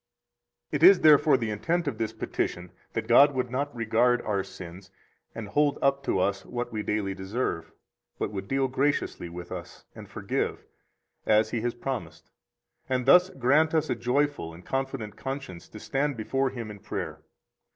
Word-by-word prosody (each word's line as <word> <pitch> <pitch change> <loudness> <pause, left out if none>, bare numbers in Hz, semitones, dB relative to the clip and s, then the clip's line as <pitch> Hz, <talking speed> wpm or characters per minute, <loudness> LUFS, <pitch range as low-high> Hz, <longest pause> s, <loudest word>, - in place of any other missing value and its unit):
92 - - -2
It 365 - +9
is - - +1
therefore 150 -2 +6
the 115 -3 -2
intent 165 +11 -1
of 120 -6 -3
this 110 -1 -1
petition 90 0 -3 0.2
that - - -3
God 140 +4 +6
would 125 -1 -1
not 140 +1 -2
regard 120 +2 +2
our 100 -3 -1
sins 90 +1 -11 0.5
and 110 -3 -6
hold 145 +5 +2
up 140 0 +2
to - - +1
us 100 +1 0
what 120 0 -4
we 110 - -2
daily 105 -2 -1
deserve, 95 -3 -3 0.5
but - - -2
would 95 -1 -5
deal 135 0 +1
graciously 130 -8 -1
with 85 +1 -9
us, 90 -1 -8
and - - -11
forgive, - - -3 0.6
as 110 0 +4
He 115 - -1
has 120 +1 -2
promised, 120 -11 -6 0.6
and 130 -1 0
thus 180 +6 +7
grant 150 +4 +2
us 155 -1 +1
a - - +1
joyful 125 - -1
and 90 +1 -14
confident 135 -6 -3
conscience 135 -11 -6
to 105 - -10
stand 140 +2 -1
before 135 +5 0
Him 115 -4 -6
in 105 - -10
prayer. 105 +2 -5
120 Hz, 175 wpm, -27 LUFS, 100-135 Hz, 0.6 s, It